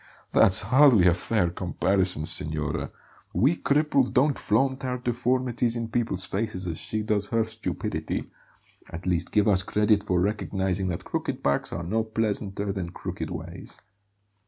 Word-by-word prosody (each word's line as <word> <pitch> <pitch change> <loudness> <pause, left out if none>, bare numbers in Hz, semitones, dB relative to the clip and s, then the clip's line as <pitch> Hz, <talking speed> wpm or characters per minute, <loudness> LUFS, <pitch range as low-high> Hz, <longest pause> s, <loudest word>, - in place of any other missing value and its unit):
"That's 95 - +5
hardly 125 -3 +6
a 90 - +6
fair 90 0 0
comparison, 90 -2 +1
signora; 75 -1 -1 0.5
we 140 +8 +3
cripples 140 -4 +2
don't 140 +2 +3
flaunt 135 +1 +1
our 125 -1 -2
deformities 125 0 0
in 115 -1 -3
people's 115 -6 -1
faces 100 -2 -3
as 85 -3 -4
she 110 0 -3
does 105 -1 0
her 115 -1 +1
stupidity. 110 0 -4 0.6
At 85 +1 -8
least 90 -1 0
give 105 -1 +3
us 95 -3 +4
credit 105 +1 +2
for 90 -3 +1
recognizing 95 -1 -1
that 90 -2 -4
crooked - - -3
backs 70 0 0
are 85 - -4
no 110 +6 0
pleasanter 105 -2 -2
than 95 -3 -4
crooked 90 -2 -6
ways. 85 +1 -7
105 Hz, 150 wpm, -26 LUFS, 90-115 Hz, 0.6 s, hardly